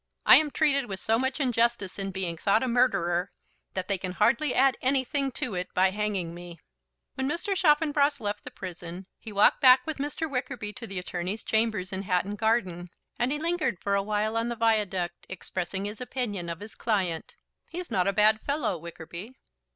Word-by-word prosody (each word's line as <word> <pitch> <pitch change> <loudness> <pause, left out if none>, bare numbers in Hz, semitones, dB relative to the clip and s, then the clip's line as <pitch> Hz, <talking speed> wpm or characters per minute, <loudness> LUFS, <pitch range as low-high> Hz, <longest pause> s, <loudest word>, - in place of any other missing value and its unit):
"I - - +10
am 310 -1 +2
treated 280 -4 +2
with 195 -2 -5
so 225 +1 +1
much 265 +3 -1
injustice 235 -7 +1
in 195 0 -2
being 185 -3 -3
thought 200 +7 +2
a - - 0
murderer 195 -7 +1 0.4
that 185 -1 -2
they 195 -2 0
can 185 0 -4
hardly 235 +8 +2
add 265 0 +4
anything 270 +1 +1
to 240 - -3
it 180 0 -4
by 185 +1 +4
hanging 200 -4 -2
me." 175 -1 -10 0.5
When 265 +1 -2
Mr. 390 +6 -1
Chaffanbrass 295 -4 +3
left 205 -1 -3
the - - -7
prison 175 +1 -8
he 220 - -9
walked 205 0 +4
back 255 -1 +7
with 315 -3 -4
Mr. 295 +3 -2
Wickerby 250 -6 -4
to 235 -1 -8
the 195 - -6
attorney's 180 +3 -4
chambers 220 -4 0
in 190 - -2
Hatton 190 +1 -1
Garden, 190 -6 0 0.3
and 245 +2 +1
he 295 - 0
lingered 315 - -1
for 200 - -1
awhile 210 +2 0
on 230 +1 0
the 235 - -3
Viaduct 205 -6 0
expressing 190 +1 -4
his 210 +2 -6
opinion 220 -9 -3
of 170 +1 -6
his 215 +1 -9
client. 185 -8 -1 0.3
"He's 355 +1 -6
not 185 -1 +1
a 200 - +2
bad 215 +1 +4
fellow, 280 - -1
Wickerby." 170 +6 -8
215 Hz, 190 wpm, -27 LUFS, 185-255 Hz, 0.5 s, I